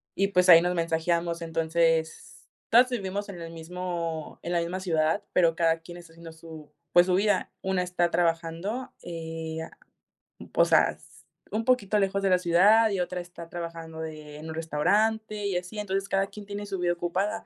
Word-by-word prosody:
y 195 Hz, -, +2 dB
pues 180 Hz, -2 st, +3 dB
ahí 165 Hz, -1 st, +10 dB
nos 180 Hz, +1 st, 0 dB
mensajeamos, 170 Hz, 0 st, 0 dB
entonces, 165 Hz, 0 st, -1 dB, 0.2 s
todas 245 Hz, +3 st, +6 dB
vivimos 205 Hz, -4 st, -3 dB
en 180 Hz, -3 st, -8 dB
el 165 Hz, 0 st, -7 dB
mismo 165 Hz, -1 st, -5 dB
en 175 Hz, -, -3 dB
la 170 Hz, -, +2 dB
misma 170 Hz, +2 st, -3 dB
ciudad, 165 Hz, +1 st, 0 dB
pero 165 Hz, -2 st, +3 dB
cada 165 Hz, -1 st, +2 dB
quien 175 Hz, +1 st, -11 dB
está 170 Hz, -2 st, -14 dB
haciendo 165 Hz, 0 st, -11 dB
su, 160 Hz, -2 st, -12 dB, 0.2 s
pues, 175 Hz, 0 st, +7 dB
su 180 Hz, -, +3 dB
vida. 200 Hz, 0 st, +1 dB
Una 190 Hz, -1 st, 0 dB
está 175 Hz, -1 st, 0 dB
trabajando, 170 Hz, +8 st, -1 dB
eh, 160 Hz, -1 st, -6 dB
ah, -, -, -12 dB, 0.8 s
o -, -, +5 dB
sea, -, -, +4 dB
s -, -, -18 dB, 0.3 s
un 220 Hz, +1 st, -2 dB
poquito 220 Hz, -5 st, +2 dB
lejos 195 Hz, 0 st, 0 dB
de 195 Hz, -, +3 dB
la 185 Hz, -1 st, +4 dB
ciudad, 195 Hz, +6 st, +5 dB
y 195 Hz, -2 st, 0 dB
otra 180 Hz, 0 st, -3 dB
está 175 Hz, -1 st, -10 dB
trabajando 165 Hz, -2 st, -7 dB
de, 155 Hz, -2 st, -7 dB
en 155 Hz, +1 st, -9 dB
un 160 Hz, -, -5 dB
restaurante 210 Hz, +7 st, 0 dB
y 190 Hz, -3 st, 0 dB
así. 180 Hz, +4 st, -6 dB
Entonces, 195 Hz, -1 st, -2 dB
cada 195 Hz, 0 st, +1 dB
quien 210 Hz, 0 st, -11 dB
tiene 205 Hz, 0 st, -6 dB
su 195 Hz, -2 st, -4 dB
vida 175 Hz, -1 st, +1 dB
ocupada, 185 Hz, +5 st, -2 dB
175 Hz, 190 wpm, -27 LUFS, 165-195 Hz, 0.8 s, ahí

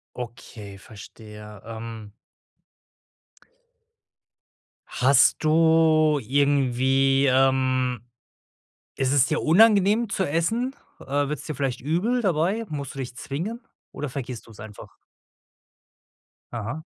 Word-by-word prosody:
Okay, 110 Hz, -4 st, -9 dB
verstehe, 105 Hz, +1 st, -13 dB
ähm. 115 Hz, -2 st, -8 dB, 2.8 s
Hast 135 Hz, +4 st, +3 dB
du 155 Hz, -1 st, +3 dB
irgendwie, 135 Hz, +1 st, +2 dB
ähm, 130 Hz, -2 st, +1 dB, 0.9 s
ist 135 Hz, 0 st, 0 dB
es 140 Hz, -2 st, +4 dB
dir 155 Hz, -, -1 dB
unangenehm 210 Hz, +4 st, +4 dB
zu 195 Hz, -, -1 dB
essen? 225 Hz, -, -1 dB, 0.2 s
Äh, 145 Hz, +1 st, -2 dB
wird's 150 Hz, -1 st, -5 dB
dir 155 Hz, -, -5 dB
vielleicht 130 Hz, -3 st, -3 dB
übel 190 Hz, -, 0 dB
dabei? 190 Hz, +4 st, 0 dB
Musst 140 Hz, -3 st, -6 dB
du -, -, -7 dB
dich 125 Hz, -2 st, -6 dB
zwingen 180 Hz, -, -5 dB, 0.3 s
oder 150 Hz, -2 st, -5 dB
vergisst 125 Hz, -3 st, -7 dB
du's 110 Hz, -3 st, -16 dB
einfach? 110 Hz, -2 st, -12 dB, 1.6 s
Aha. 120 Hz, +7 st, -5 dB
140 Hz, 100 wpm, -24 LUFS, 125-160 Hz, 2.8 s, es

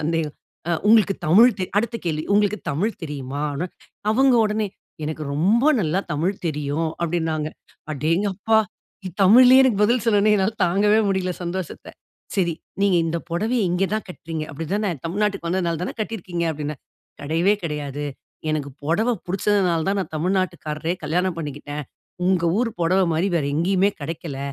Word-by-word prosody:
சந்தேகம். 160 Hz, -1 st, -1 dB, 0.3 s
ஆ -, -, +1 dB, 0.2 s
உங்களுக்கு 210 Hz, -3 st, +5 dB
தமிழ் 225 Hz, +10 st, +6 dB
தெரி 185 Hz, -, -2 dB
அடுத்த 230 Hz, +2 st, -1 dB
கேள்வி 155 Hz, -3 st, -1 dB
உங்களுக்கு 210 Hz, 0 st, +2 dB
தமிழ் 190 Hz, +10 st, -1 dB
தெரியுமான்னு. 145 Hz, +1 st, -3 dB, 0.4 s
அவங்க 260 Hz, +3 st, +4 dB
உடனே, 215 Hz, 0 st, 0 dB, 0.4 s
"எனக்கு 155 Hz, 0 st, -4 dB
ரொம்ப 200 Hz, -, +3 dB, 0.2 s
நல்லா 175 Hz, +1 st, +1 dB
தமிழ் 170 Hz, +7 st, 0 dB
தெரியும்." 150 Hz, +1 st, -1 dB
அப்டின்னாங்க. 160 Hz, -2 st, -1 dB, 0.4 s
அடேங்கப்பா! 190 Hz, +9 st, +1 dB, 0.6 s
தமிழ்லயே 250 Hz, +6 st, +8 dB
எனக்கு 225 Hz, -6 st, +2 dB
பதில் 235 Hz, +2 st, +2 dB
சொன்னவுடனே, 210 Hz, -1 st, +4 dB
என்னால 195 Hz, +2 st, +1 dB
தாங்கவே 205 Hz, +4 st, +3 dB
முடியல, 190 Hz, -2 st, 0 dB
சந்தோஷத்த. 180 Hz, 0 st, -5 dB, 0.5 s
சரி. 175 Hz, -3 st, +2 dB, 0.3 s
"நீங்க 200 Hz, -3 st, +4 dB
இந்த 165 Hz, -, -1 dB
புடவைய 220 Hz, +7 st, 0 dB
இங்க 180 Hz, +2 st, +1 dB
தா -, -, +2 dB
கட்றீங்க, 160 Hz, -3 st, -5 dB
அப்டி 155 Hz, +3 st, -5 dB
தான? 205 Hz, -2 st, 0 dB, 0.2 s
தமிழ்நாட்டுக்கு 195 Hz, 0 st, -1 dB
வந்ததனால 170 Hz, -2 st, -1 dB
தான -, -, -4 dB
கட்டிருக்கீங்க?" 185 Hz, -6 st, -3 dB
அப்டின்னேன். 150 Hz, -2 st, -5 dB, 0.4 s
கெடையவே 165 Hz, +7 st, +2 dB
கெடையாது. 145 Hz, -2 st, -4 dB, 0.5 s
எனக்கு 150 Hz, -2 st, -2 dB
புடவ 170 Hz, +11 st, +1 dB, 0.2 s
புடிச்சதனால 185 Hz, -3 st, +1 dB
தான், 200 Hz, +1 st, +1 dB
நான் 190 Hz, -, -5 dB
தமிழ்நாட்டுக்காரரையே 170 Hz, -2 st, -1 dB
கல்யாணம் 180 Hz, +3 st, 0 dB
பண்ணிக்கிட்டேன். 145 Hz, -1 st, -5 dB, 0.4 s
உங்க 180 Hz, -2 st, +2 dB, 0.2 s
ஊர் 240 Hz, -1 st, +1 dB
புடவ 180 Hz, +3 st, +3 dB
மாரி 170 Hz, +5 st, +1 dB
வேற 155 Hz, -, 0 dB
எங்கயுமே 190 Hz, +5 st, +2 dB
கெடைக்கல. 155 Hz, -1 st, -5 dB
175 Hz, 140 wpm, -22 LUFS, 155-205 Hz, 0.6 s, தமிழ்லயே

